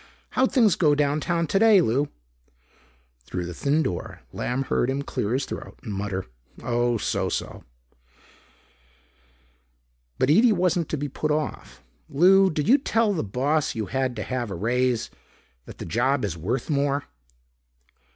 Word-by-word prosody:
How'd 260 0 +2
things 225 -7 +4
go 150 -4 +3
downtown 150 +4 0
today, 205 +4 +5
Lou?" 140 -1 +1 1.2
Through 90 -1 -4
the 85 - -6
thin 145 - +1
door, 90 - -5
Lamb 125 +2 -2
heard 130 -1 0
him 135 +1 -1
clear 105 -5 -3
his 135 +1 0
throat, - - -8
mutter, 100 -3 -4 0.4
"Oh, 120 0 +1
so - - -1
so." - - -4 2.5
But 130 - +2
Ede 220 +7 +5
wasn't 175 -3 0
to 155 - -2
be 145 +1 -3
put 150 +3 -3
off. 150 -1 -3 0.3
"Lou, 190 +6 +5
did 150 -1 -2
you 270 +6 +6
tell 225 -5 +1
the 165 - -1
boss 140 +9 0
you 110 -2 -2
had 130 +4 -2
to 110 - -4
have 125 -3 -3
a 95 - -5
raise, 120 +4 0 0.5
that - - -11
the - - -7
job 120 - +1
is 95 -5 -3
worth 110 +10 -3
more?" 140 -1 0
140 Hz, 150 wpm, -25 LUFS, 120-165 Hz, 2.5 s, you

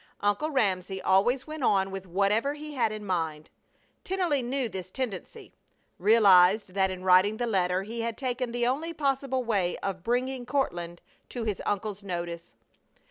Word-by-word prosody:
Uncle 205 +9 +1
Ramsey 190 - 0
always 240 +9 +2
went 310 -1 -7
on 195 -5 +2
with 190 -1 -6
whatever 205 +10 +1
he 300 0 -8
had 235 -5 +1
in 215 -1 -6
mind. 160 -5 -3 0.5
Tennelly 360 -7 0
knew 255 +1 -1
this 190 -4 -7
tendency, 215 -4 -6 0.5
realized 200 -1 +5
that 190 -1 +2
in 185 -1 -6
writing 185 +3 +5
the 240 - -1
letter 185 -4 +1
he 230 +3 -5
had 230 -1 -3
taken 250 -2 -2
the 240 0 0
only 300 +7 -1
possible 270 -3 0
way 200 -7 0
of 190 -2 -4
bringing 250 +3 -1
Courtland 175 -11 -2 0.3
to 240 - -4
his 210 -4 -2
uncle's 205 0 -2
notice. 170 -7 -5
210 Hz, 160 wpm, -28 LUFS, 185-255 Hz, 0.5 s, realized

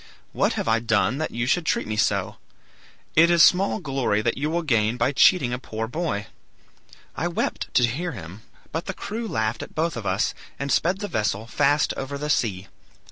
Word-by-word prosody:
What - - +1
have - - -3
I 115 0 +3
done 115 +4 +1
that 155 - -1
you 120 +1 -2
should 175 +7 +1
treat - - 0
me 110 - -3
so? 105 - 0 0.8
It 165 +2 +6
is 170 -2 +6
small 180 - +4
glory 135 -7 0
you 145 +4 -2
will 170 +2 -1
gain 115 -5 +1
by 125 +3 +2
cheating 140 -3 +4
a 125 - -2
poor 110 -3 -4
boy.' 135 -7 -2 0.9
I - - -1
wept - - -2
to 125 - +5
hear 155 +9 -3
him, 90 +1 -9 0.3
but 165 +2 -4
the - - -4
crew 225 +2 -5
laughed 110 - -1
at - - -9
both 165 0 0
of 115 -4 -5
us, 95 +3 +1 0.2
and 140 0 -3
sped 180 +8 +1
the 205 - -2
vessel 110 - -1
fast 145 +5 +2
over 140 +1 -4
the 150 +1 -2
sea. 100 -8 0
130 Hz, 195 wpm, -24 LUFS, 110-160 Hz, 0.9 s, It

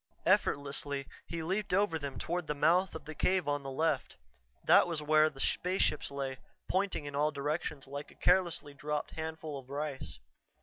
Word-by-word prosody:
Effortlessly 140 0 +1 0.2
he 165 -1 -4
leaped 190 +2 0
over 185 -5 +2
them 140 -2 -5
toward 175 -1 -2
the 150 - -1
mouth 170 +5 +3
of - - -7
the 155 - -6
cave 180 +2 +1
on 145 0 +1
the 135 - -6
left. 140 -1 0 0.5
That - - +6
was 165 -3 -2
where 155 +1 +5
the 135 - -14
spaceships 180 -1 +1
lay, 135 -2 -4 0.3
pointing 190 -5 0
in 145 -1 -5
all 150 +2 +3
directions 145 0 -2
like 140 +2 -6
a - - -17
carelessly 175 -5 +2
dropped 150 +1 -3
handful 160 -2 -5
of 130 -1 -15
rice. 140 - -4
150 Hz, 175 wpm, -32 LUFS, 140-170 Hz, 0.5 s, That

